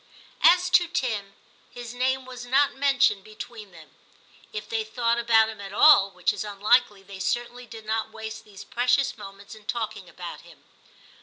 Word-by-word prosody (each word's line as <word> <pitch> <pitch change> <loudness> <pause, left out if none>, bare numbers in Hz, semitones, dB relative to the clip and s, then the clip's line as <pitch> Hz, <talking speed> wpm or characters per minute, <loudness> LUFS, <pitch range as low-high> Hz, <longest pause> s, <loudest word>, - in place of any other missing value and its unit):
As 360 0 +5
to 355 -1 +5
Tim, 225 - -3 0.3
his 240 -1 -9
name 260 +1 -1
was 250 -1 -9
not 270 +3 +2
mentioned 270 -7 +2
between 215 0 -10
them; 165 -2 -16 0.6
if 430 - -6
they 455 -2 -1
thought 235 - 0
about 225 -2 +4
him 220 -2 -8
at 195 0 -8
all, 210 -6 +7
which 180 0 -1
is 205 - -4
unlikely, 205 0 +1
they 195 0 -11
certainly 240 +4 -3
did 225 -2 -11
not 220 0 -2
waste 220 0 -8
these 200 -2 -12
precious 250 +3 +1
moments 200 -1 -11
in 215 -1 -15
talking 225 0 -4
about - - -9
him. - - -18
230 Hz, 170 wpm, -25 LUFS, 205-255 Hz, 0.6 s, all